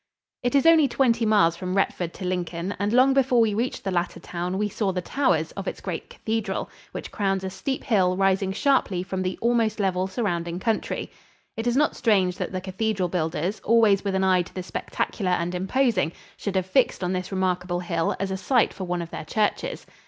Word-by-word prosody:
It 245 +2 0
is 280 - +4
only 325 -3 +7
twenty 235 -3 +2
miles 200 -6 +4
from 185 +2 -3
Retford 180 -3 0
to 185 - -6
Lincoln, 180 0 -2
and 205 +1 0
long 255 +3 +5
before 265 -2 +3
we 225 -2 +3
reached 235 +5 -2
the 195 - -2
latter 175 -1 -1
town 180 +2 -4
we 210 +1 +1
saw 205 -1 -1
the 185 - -2
towers 175 - +1
of 195 -1 -7
its - - -4
great - - -5
cathedral, 225 -1 -3 0.2
which - - -7
crowns 195 -2 0
a 190 - -3
steep 265 +7 -3
hill 185 -6 +2
rising 195 0 +2
sharply 200 -6 +1
from 190 0 -3
the 185 0 -2
almost 230 -2 +2
level 190 -2 +1
surrounding 175 -5 -2
country. 220 +3 -2 0.4
It 225 +2 -3
is 240 +1 +2
not 300 +1 +2
strange 190 -6 +2
that - - -3
the 185 -1 -3
cathedral 190 0 -1
builders, 170 +3 -1
always 220 -3 +4
with 200 -2 -1
an 190 - +1
eye 185 -1 +4
to 175 - -9
the 185 - -4
spectacular 185 +1 -2
and 175 0 -1
imposing, 190 -2 +1 0.2
should 200 -2 -4
have 185 -1 +1
fixed 195 0 +2
on 180 +1 0
this 185 +1 -3
remarkable 180 -2 -1
hill 170 -2 -1
as 195 0 -2
a 190 - -1
site 240 +6 +2
for 190 - -5
one 175 -1 -2
of 165 - -10
their - - -6
churches. 220 - -1
190 Hz, 210 wpm, -25 LUFS, 180-225 Hz, 0.4 s, only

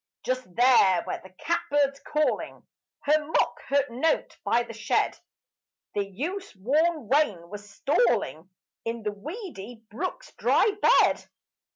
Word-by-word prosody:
Just 255 -8 -3
there 235 -8 +5
where - - -5
the 190 - -12
catbird's 280 - 0
calling 300 +1 -1 0.4
Her 305 +1 +3
mock 305 - 0
hurt 280 -2 +1
note 265 +7 0
by 240 - +2
the 235 -1 -9
shed, 215 -1 0 0.8
The 205 - 0
use 340 - -5
worn 295 - +1
wain 210 - +1
was 205 0 -9
stalling 225 - 0 0.3
In 230 0 -4
the 210 - -1
weedy 245 - -8
brook's 370 - -5
dry 430 - +3
bed. - - +4
245 Hz, 130 wpm, -27 LUFS, 205-305 Hz, 0.8 s, there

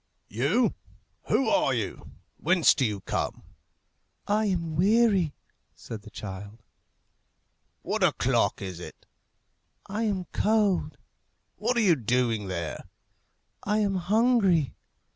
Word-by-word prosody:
"You? 140 - +1 0.5
Who 270 - +2
are 300 - +2
you? - - -5 0.2
whence 180 -3 +4
do 135 - -1
you 105 -3 -2
come?" - - -3 0.8
"I 215 +1 +1
am 170 -5 -1
weary," 195 -3 +3 0.4
said 110 -2 -8
the 110 - -12
child. 105 +1 -8 1.2
"What - - -1
o'clock - - +1
is 95 -3 -6
it?" - - -11 0.8
"I 215 +3 -2
am 195 -4 -1
cold." 210 -3 +1 0.6
"What 245 - 0
are - - +4
you 185 -6 +5
doing 120 -4 0
there?" 85 -4 -4 0.8
"I 210 +2 +1
am 205 -2 +1
hungry." 195 - +2
175 Hz, 115 wpm, -27 LUFS, -, 1.2 s, you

